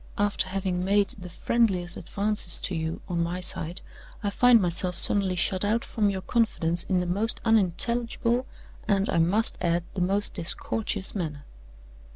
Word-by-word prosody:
After 205 Hz, -2 st, +1 dB
having 185 Hz, -1 st, -2 dB
made 200 Hz, +1 st, +2 dB
the 180 Hz, -3 st, -4 dB
friendliest 185 Hz, -2 st, 0 dB
advances 200 Hz, 0 st, -2 dB
to 190 Hz, -, -2 dB
you 160 Hz, -1 st, -4 dB
on 170 Hz, -2 st, -2 dB
my 170 Hz, +2 st, -2 dB
side, 175 Hz, -1 st, -1 dB, 0.4 s
I 205 Hz, -, -1 dB
find 245 Hz, +2 st, +5 dB
myself 180 Hz, -1 st, +2 dB
suddenly 195 Hz, -2 st, +4 dB
shut 185 Hz, +1 st, +2 dB
out 220 Hz, +3 st, 0 dB
from 210 Hz, -3 st, 0 dB
your 190 Hz, -1 st, -4 dB
confidence 175 Hz, -8 st, +1 dB
in 185 Hz, 0 st, 0 dB
the -, -, -3 dB
most 200 Hz, +6 st, -1 dB
unintelligible, 230 Hz, +4 st, +1 dB, 0.4 s
and, 200 Hz, -2 st, +1 dB
I -, -, +1 dB
must 200 Hz, +8 st, +1 dB
add, 170 Hz, -1 st, 0 dB
the 190 Hz, -, -3 dB
most 200 Hz, +3 st, +1 dB
discourteous 190 Hz, +3 st, -1 dB
manner. 155 Hz, -7 st, -5 dB
190 Hz, 160 wpm, -26 LUFS, 175-210 Hz, 0.4 s, find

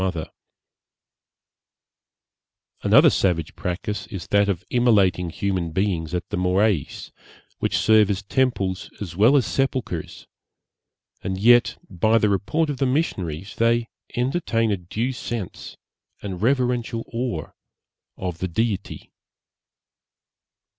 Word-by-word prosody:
Another -, -, +6 dB
savage 85 Hz, -5 st, 0 dB
practice 90 Hz, +4 st, -4 dB
is 95 Hz, -6 st, -7 dB
that 100 Hz, 0 st, +3 dB
of 95 Hz, -2 st, -2 dB
immolating 100 Hz, -8 st, +3 dB
human 90 Hz, -1 st, -2 dB
beings 90 Hz, -3 st, -1 dB
at 90 Hz, -, -3 dB
the -, -, -3 dB
Morais, 90 Hz, -3 st, 0 dB, 0.5 s
which -, -, 0 dB
serve 110 Hz, -2 st, +4 dB
as 100 Hz, -1 st, -1 dB
temples 100 Hz, -6 st, 0 dB
as 90 Hz, -5 st, -6 dB
well 115 Hz, +9 st, +5 dB
as 130 Hz, -, +2 dB
sepulchres, 130 Hz, -, -2 dB, 1.0 s
and 95 Hz, 0 st, -3 dB
yet, 120 Hz, +3 st, +5 dB
by 110 Hz, +5 st, +2 dB
the 105 Hz, -2 st, +2 dB
report 145 Hz, +11 st, 0 dB
of 140 Hz, -, -5 dB
the 135 Hz, -, +1 dB
missionaries, 95 Hz, -, -2 dB
they 115 Hz, 0 st, +2 dB, 0.3 s
entertain 120 Hz, -4 st, 0 dB
a 100 Hz, -, +1 dB
due 105 Hz, +8 st, -3 dB
sense 120 Hz, -5 st, -6 dB, 0.5 s
and 95 Hz, -3 st, -5 dB
reverential 120 Hz, -2 st, 0 dB
awe 115 Hz, -, -3 dB, 0.7 s
of 90 Hz, -3 st, -4 dB
the 95 Hz, -, -1 dB
Deity. 100 Hz, +2 st, -3 dB
105 Hz, 115 wpm, -23 LUFS, 90-120 Hz, 1.0 s, Another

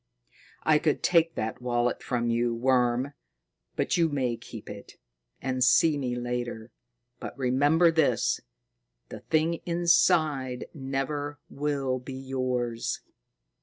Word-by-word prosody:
"I 155 Hz, -1 st, +4 dB
could 150 Hz, -1 st, 0 dB
take 165 Hz, -2 st, +3 dB
that 110 Hz, +2 st, -3 dB
wallet 120 Hz, 0 st, 0 dB
from 120 Hz, -1 st, -1 dB
you, 120 Hz, 0 st, +1 dB
worm, 125 Hz, +2 st, +1 dB, 0.6 s
but -, -, 0 dB
you 165 Hz, -1 st, +3 dB
may 130 Hz, -5 st, 0 dB
keep -, -, -11 dB
it, -, -, -9 dB, 0.5 s
and 130 Hz, -1 st, 0 dB
see 155 Hz, +4 st, +5 dB
me 130 Hz, -4 st, -2 dB
later. 120 Hz, -2 st, -4 dB, 0.5 s
But -, -, -7 dB
remember 145 Hz, +6 st, +3 dB
this 160 Hz, -2 st, +2 dB, 0.7 s
the -, -, -8 dB
thing 160 Hz, +1 st, 0 dB
inside 160 Hz, -6 st, +2 dB
never 145 Hz, +1 st, -3 dB
will 140 Hz, -3 st, -1 dB
be 130 Hz, +1 st, -8 dB
yours." 130 Hz, -3 st, -2 dB
130 Hz, 120 wpm, -27 LUFS, 125-150 Hz, 0.7 s, see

